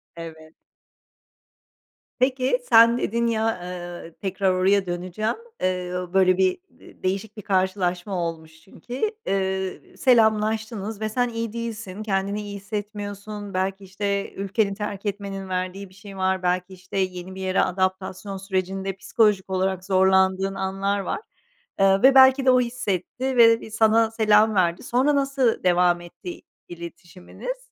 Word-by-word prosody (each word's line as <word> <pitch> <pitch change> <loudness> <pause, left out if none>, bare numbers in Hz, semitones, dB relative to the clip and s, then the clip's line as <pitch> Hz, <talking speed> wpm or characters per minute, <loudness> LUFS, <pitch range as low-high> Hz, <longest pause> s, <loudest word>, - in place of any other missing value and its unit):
Evet. 160 -1 -10 1.7
Peki, 255 -1 +2
sen 230 +1 +7
dedin 235 0 0
ya, 225 -1 +1 0.2
ııı, 175 -2 -7
tekrar 190 -1 0
oraya 190 +1 +2
döneceğim. 180 +5 -2 0.3
Iıı, 180 0 -2
böyle 185 -1 +4
bir 190 -1 +2
de - - -19
değişik 200 +3 -2
bir - - -6
karşılaşma 185 -1 0
olmuş 160 -1 -9
çünkü. 250 - -4 0.2
Iıı, 190 -1 -2
selamlaştınız 220 -3 +1
ve 215 - -1
sen 245 +2 0
iyi 230 -1 -4
değilsin, 220 -3 -5
kendini 200 0 -1
iyi 205 -1 -7
hissetmiyorsun. 205 0 -6
Belki, 190 +1 -2
işte, 200 +1 -3
ülkenin 200 +1 -1
terk 205 0 -5
etmenin 195 -1 -4
verdiği 185 +1 -3
bir 185 - -20
şey 200 0 -12
var, 190 0 0
belki, 180 +1 0
işte, 185 +1 -8
yeni 185 0 -3
bir 190 - -7
yere 185 0 +1
adaptasyon 190 +1 -2
sürecinde 190 0 -2
psikolojik 195 0 +1
olarak 190 0 -1
zorlandığın 190 0 +3
anlar 195 +1 -1
var. 195 - -3 0.6
Iıı, 195 0 +4
ve 270 0 +7
belki 265 0 +7
de 260 - +6
o 255 - +5
hissetti 250 +1 -2
ve 230 -1 +6
bir 220 - -10
sana 220 0 +3
selam 215 -1 +4
verdi. 175 -2 +1
Sonra 265 +4 +2
nasıl 275 -4 +1
devam 175 -1 +3
etti 175 +1 -10
i - - -16 0.3
iletişiminiz? 175 - -8
195 Hz, 140 wpm, -24 LUFS, 185-220 Hz, 1.7 s, sen